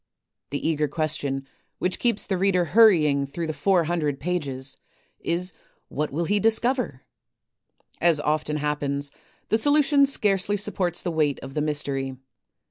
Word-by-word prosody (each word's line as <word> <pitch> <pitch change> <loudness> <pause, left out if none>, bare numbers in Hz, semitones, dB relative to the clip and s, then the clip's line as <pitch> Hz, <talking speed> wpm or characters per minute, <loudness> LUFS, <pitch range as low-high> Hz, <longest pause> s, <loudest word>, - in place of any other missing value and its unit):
The 145 +3 -2
eager 155 -2 +1
question 145 -3 -2 0.3
which 180 - -2
keeps 235 -4 +1
the 195 - -1
reader 185 -2 +2
hurrying 155 -8 +4
through 165 +5 -4
the 155 - -3
four 175 +4 +2
hundred 155 -4 -1
pages 140 -5 -3 0.4
is 180 +2 -1 0.2
* - - -40
What 150 +1 -2
will 165 +5 -1
he 205 +4 +2
discover? 225 - +1 0.5
' - - -37
As 155 - 0
often 150 0 -1
happens, 145 -1 -2 0.4
the 220 - +3
solution 290 +1 +4
scarcely 205 -5 +1
supports 185 -4 -1
the 175 - -1
weight 150 -3 +1
of 135 0 -8
the 150 - -1
mystery. 140 -3 -1
160 Hz, 150 wpm, -25 LUFS, 145-195 Hz, 0.5 s, hurrying